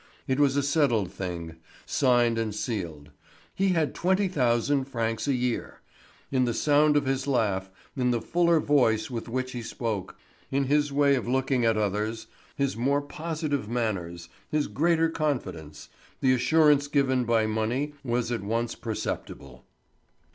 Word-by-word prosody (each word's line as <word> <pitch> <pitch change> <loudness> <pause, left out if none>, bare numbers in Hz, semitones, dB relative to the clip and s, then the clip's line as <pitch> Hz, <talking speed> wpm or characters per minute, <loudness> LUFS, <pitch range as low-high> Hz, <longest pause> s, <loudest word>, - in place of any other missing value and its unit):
It 130 +1 0
was 140 -1 +3
a 140 - +2
settled 135 - +1
thing, 85 -3 -5 0.3
signed 120 -3 +2
and 110 -2 -2
sealed; 90 - -4 0.4
he 195 - +1
had 165 -5 +1
twenty 190 +2 +1
thousand 130 -3 +1
francs 115 -2 -2
a 140 - +2
year. 125 -1 -2 0.5
In 130 -2 +2
the 120 -1 -1
sound 150 0 +4
of 145 - +1
his 135 +1 -1
laugh, 100 -8 0 0.3
in 125 -2 +1
the 120 -1 +1
fuller 170 +4 +2
voice 125 -7 +2
with 115 -1 -5
which 130 +1 -2
he 120 - -5
spoke, 110 -4 -4 0.3
in 140 +1 +1
his 145 +2 +1
way 140 0 +3
of 125 -3 -1
looking 130 -1 +1
at 115 -1 +3
the 110 - +1
others, 105 +3 -2 0.3
his 140 -5 -1
more 140 +5 +1
positive 150 -5 -3
manners, 90 -8 -3 0.2
his 150 -1 +1
greater 165 +1 +2
confidence, 95 - -3 0.3
the 130 -1 +3
assurance 145 +2 +4
given 135 -3 +2
by 115 -2 +2
money 115 +7 -1
was 120 -1 -1
at 115 - -1
once 115 +3 -1
perceptible. 70 - -6
125 Hz, 155 wpm, -27 LUFS, 110-145 Hz, 0.5 s, sound